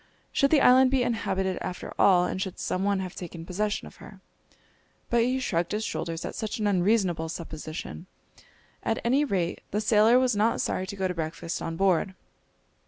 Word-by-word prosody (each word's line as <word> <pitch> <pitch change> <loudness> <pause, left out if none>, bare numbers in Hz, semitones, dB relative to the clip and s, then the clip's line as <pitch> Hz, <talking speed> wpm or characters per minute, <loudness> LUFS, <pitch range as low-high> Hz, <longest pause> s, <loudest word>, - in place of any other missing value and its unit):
Should 275 - +3
the 295 -2 +4
island 255 +1 +6
be 260 -1 +2
inhabited 190 -6 -1
after 180 -1 -5
all, 180 -2 +5
and 185 - -3
should 190 -2 -4
some 185 - -2
one 200 -1 +1
have 185 -2 -6
taken 170 -2 -8
possession 205 +4 -2
of - - -13
her? - - -13 0.9
But 235 0 +4
he 255 +3 +1
shrugged 175 -8 -1
his 215 +1 -1
shoulders 165 -5 -4
at - - -5
such 215 -1 -4
an 215 - -2
unreasonable 185 -4 +1
supposition. 160 +1 -7 0.7
At 225 - -1
any 265 +5 +3
rate 185 -10 -1
the 210 - -1
sailor 215 +2 +5
was 255 -3 +2
not 215 +3 +2
sorry 185 - -1
to 200 - -6
go 190 -1 -1
to 180 - -3
breakfast 165 0 -4
on 165 0 -4
board. 190 0 +2
195 Hz, 185 wpm, -27 LUFS, 175-225 Hz, 0.9 s, island